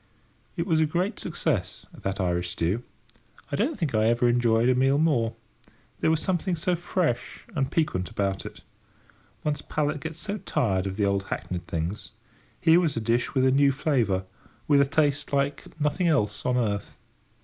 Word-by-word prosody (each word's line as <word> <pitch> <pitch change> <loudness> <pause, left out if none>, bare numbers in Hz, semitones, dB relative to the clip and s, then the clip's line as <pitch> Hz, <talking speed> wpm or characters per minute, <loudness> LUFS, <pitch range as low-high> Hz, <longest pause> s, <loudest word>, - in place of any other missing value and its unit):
It 170 - -1
was 160 -4 +2
a 155 - +3
great 180 +7 -1
success, 140 - -2
that 95 +1 -4
Irish 90 -1 0
stew. 90 +7 -1 0.7
I - - 0
don't 250 - 0
think 160 - -1
I 110 0 +3
ever 120 +2 +3
enjoyed 120 -1 +3
a 130 - +5
meal 135 +2 +3
more. 140 -8 +2 0.6
There - - +2
was 160 -1 +2
something 185 0 0
so 180 +2 0
fresh 175 -7 -2
and 135 -3 0
piquant 95 - 0
about 95 -1 -1
it. - - -9 0.8
One's 150 -1 -1
palate 150 -1 -1
gets 160 +2 -6
so 205 +3 -4
tired 105 - 0
of 95 - -4
the 105 - +2
old 100 0 0
hackneyed 90 -3 -4
things: 85 +5 -4 0.5
here 165 +1 +5
was 165 -8 0
a - - +2
dish 115 +4 0
with 130 -1 +3
a 130 - +5
new 140 +1 +4
flavour, 120 -10 0 0.4
with 145 -2 +5
a - - +5
taste 145 -1 +1
like 140 +1 0
nothing 150 +4 +1
else 115 -11 +1
on 125 0 +2
earth. 105 -4 -2
135 Hz, 180 wpm, -26 LUFS, 105-160 Hz, 0.8 s, a